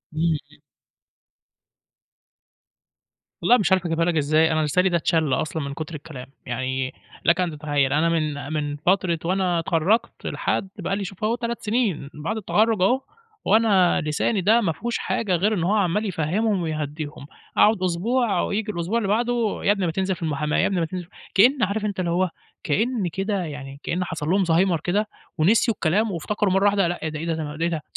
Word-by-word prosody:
إمم، 155 - -2 0.3
إمم. - - -20 2.8
والله 245 - +5
مش 195 -4 0
عارف 190 -1 +3
أجيبها 165 0 +1
لك 175 -1 0
إزاي، 155 +2 +3
أنا 155 0 +1
لساني 180 +5 +2
ده 175 - +2
اتْشَل 160 -4 +1
أصلًا 155 +3 -1
من 140 0 -4
كُتر 155 +2 -6
الكلام. 140 -4 -9 0.2
يعني 130 +1 -2 0.3
لك 170 +2 +4
أن 180 -2 0
تتخيّل، 145 -3 0
أنا 160 +3 +3
من 150 -3 -2
من 145 -1 -2
فترة 175 +1 +1
وأنا 180 -1 +1
أتخرَّجت 190 +9 0
لحد 195 - -1
بقى 195 - -1
لي 200 - -3
شوف 195 +2 -8
أهو 225 +2 +2
3 235 -1 -4
سِنين 210 - 0
بعد 165 +9 -4
التخرُّج 215 0 +1
أهو، 250 +8 +3 0.4
وأنا 200 -4 +4
لساني 155 +7 0
ده 220 +6 +4
ما 175 - +1
فيهوش 235 +9 -3
حاجة 195 -6 -1
غير 205 +6 +1
إن 180 -6 -1
هو 190 +5 +2
عمّال 205 +1 +1
يفهِّمهم 190 +3 0
ويهدّيهم، 150 -2 -4 0.3
أقعُد 210 -3 +4
أسبوع 210 +6 +1
وييجي 210 +1 -2
الأسبوع 180 +5 -2
اللي 215 - -1
بعده 230 +1 0
"يا 200 - +4
ابني 195 -3 0
ما 165 - 0
تنزل 190 +2 -1
في - - -16
المُحاماة، 150 -2 -1
يا - - +3
ابني 190 -2 0
ما 165 - +1
تنزل" 180 +1 -6 0.3
كإن 245 +6 +5
عارف 210 +2 0
أنت 200 -2 -3
اللي 170 -2 0
هو 185 +1 +1 0.3
كإن 215 - 0
كده 195 +2 -2
يعني 140 -3 -7
كإن 180 +2 -1
حصل 160 -3 -4
لهم 195 +2 +3
زهايمر 170 0 +2
كده 200 +7 0 0.3
ونسيوا 215 +7 +3
الكلام 200 +7 +1
وافتكروا 190 +3 -1
مرّة 195 +1 +3
واحدة 200 -3 +3
لأ، 175 - -3
إيه 160 - -1
ده، 155 - -6
ده 170 - -1
إيه 160 - 0
ده، 160 - -3
ده 165 +2 -1
إيه - - +1
ده؟ 160 -3 -3
180 Hz, 195 wpm, -23 LUFS, 155-205 Hz, 2.8 s, والله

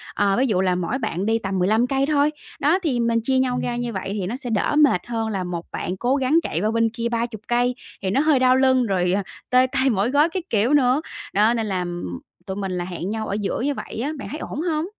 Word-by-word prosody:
ờ, 200 0 +2
ví 265 - +2
dụ 190 -5 +1
là 185 -1 +2
mỗi 180 +8 -1
bạn 195 -5 -2
đi 225 +1 +2
tầm 195 -2 -2
15 220 +7 +3
cây 270 +1 +1
thôi. 295 0 +2 0.3
Đó, 310 +7 +3
thì 260 -7 0
mình 230 0 +2
chia 260 +2 +1
nhau 250 -1 +1
ra 240 - -2
như 240 -1 -3
vậy 190 0 -4
thì 195 -3 -2
nó 230 - -3
sẽ 255 -2 -6
đỡ 220 +6 0
mệt 290 -12 +5
hơn 225 -2 -2
là 195 -4 -2
một 175 -1 -5
bạn 185 - -4
cố 250 +6 +1
gắng 275 +4 +2
chạy 165 - -2
qua 215 +1 +1
bên 230 0 +2
kia 235 +1 -3
30 230 -2 -2
cây 245 +1 +1 0.3
thì 190 - -1
nó 205 - +2
hơi 305 -4 +3
đau 255 0 +5
lưng, 260 -1 +3
rồi, 180 -4 +1
ờ, 200 +1 +1 0.3
tê 255 0 +5
tay, 270 -1 +2
mỏi 210 +1 +1
gối 295 +3 +4
các 355 +1 -4
kiểu 230 +5 +2
nữa, 265 0 +4 0.3
đó, 215 +4 +4
nên 225 -2 -1
là 185 -2 -1 0.6
tụi 190 -1 -4
mình 195 -2 -3
là 180 -1 -2
hẹn 180 +1 -5
nhau 220 0 -3
ở - - -3
giữa 205 +3 -2
như 285 +2 0
vậy 230 - -6
á, 295 - -1
bạn - - -7
thấy 305 - -6
ổn 300 - -5
hông? 320 -2 0
235 Hz, 270 wpm, -22 LUFS, 195-265 Hz, 0.6 s, mệt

